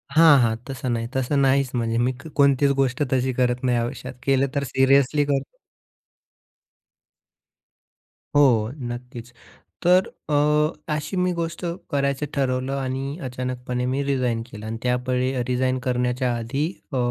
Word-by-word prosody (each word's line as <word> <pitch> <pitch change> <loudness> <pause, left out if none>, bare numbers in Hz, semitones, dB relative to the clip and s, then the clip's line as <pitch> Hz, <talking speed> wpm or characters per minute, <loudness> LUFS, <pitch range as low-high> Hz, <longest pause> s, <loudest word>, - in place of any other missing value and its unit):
हां, 160 -2 +8
हां. 110 -1 +2
तसं 130 -1 -4
नाही, 115 0 -2
तसं 130 +2 0
नाहीच 135 0 +3
म्हणजे 115 -1 0
मी 125 - +2 0.2
कोणतीच 140 0 +4
गोष्ट 135 +1 +1
तशी 130 0 +1
करत 125 0 0
नाही 125 -2 +2
आयुष्यात. 125 +2 -4
केलं 135 0 +2
तर 140 - +1
सिरियसली 140 +2 +4
करतो. 140 -1 -2 2.8
हो, 120 -6 +4
नक्कीच. 120 -2 -7 0.5
तर 180 +1 +5 0.2
अ, 150 +1 +1
अशी 150 +5 -3
मी 180 0 +2
गोष्ट 165 -1 -4 0.3
करायचं 140 0 0
ठरवलं 130 -1 -1
आणि 135 +3 -3
अचानकपणे 125 -1 -3
मी 135 +2 0
रिजाइन 125 -4 0
केलं 105 -3 -10
आणि 110 +1 -4
त्या 125 0 +2
वेळी 130 0 +1 0.2
रिजाइन 130 +1 0
करण्याच्या 125 0 0
आधी 130 +6 -2 0.3
अ, - - 0
130 Hz, 135 wpm, -23 LUFS, 125-140 Hz, 2.8 s, हां